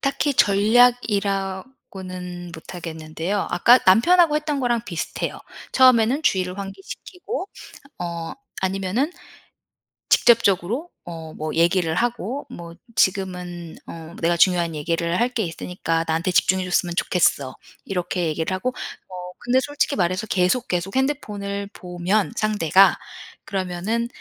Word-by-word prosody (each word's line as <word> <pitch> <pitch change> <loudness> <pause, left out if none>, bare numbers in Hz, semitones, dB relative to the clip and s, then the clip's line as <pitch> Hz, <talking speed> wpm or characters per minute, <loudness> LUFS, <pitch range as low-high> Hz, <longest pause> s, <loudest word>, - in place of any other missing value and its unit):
딱히 280 +1 0
전략이라고는 195 -5 +1
못하겠는데요. 165 +3 -4
아까 235 +8 +6
남편하고 305 - +5
했던 300 -2 -2
거랑 240 -3 +1
비슷해요. 170 -7 -4 0.3
처음에는 255 +2 +5
주의를 185 -7 0
환기시키고 345 - -7 0.5
어 170 -2 -4 0.3
아니면은 195 - 0 1.0
직접적으로 230 - +3 0.2
어 160 -2 -8
뭐 155 0 -4
얘기를 170 -1 +2
하고 240 - -2
뭐 170 -1 -9 0.2
"지금은 180 -4 -1
어 165 0 -9
내가 170 +1 +2
중요한 170 -2 +3
얘기를 170 +3 -1
할 240 - +2
게 235 -4 -2
있으니까 165 -1 -2
나한테 165 +3 0
집중해 185 +1 +3
줬으면 175 -1 0
좋겠어." 145 -8 +1 0.3
이렇게 180 -2 -2
얘기를 160 +3 -2
하고 185 +7 -1 0.4
어 - - -13 0.3
근데 245 +2 +2
솔직히 290 +1 -1
말해서 185 +3 0
계속 190 +7 +1
계속 180 +2 -2
핸드폰을 205 -7 -2
보면 180 +5 -1
상대가 195 -4 +4 0.5
그러면은 195 +4 -2
190 Hz, 300 characters per minute, -22 LUFS, 175-230 Hz, 1.0 s, 아까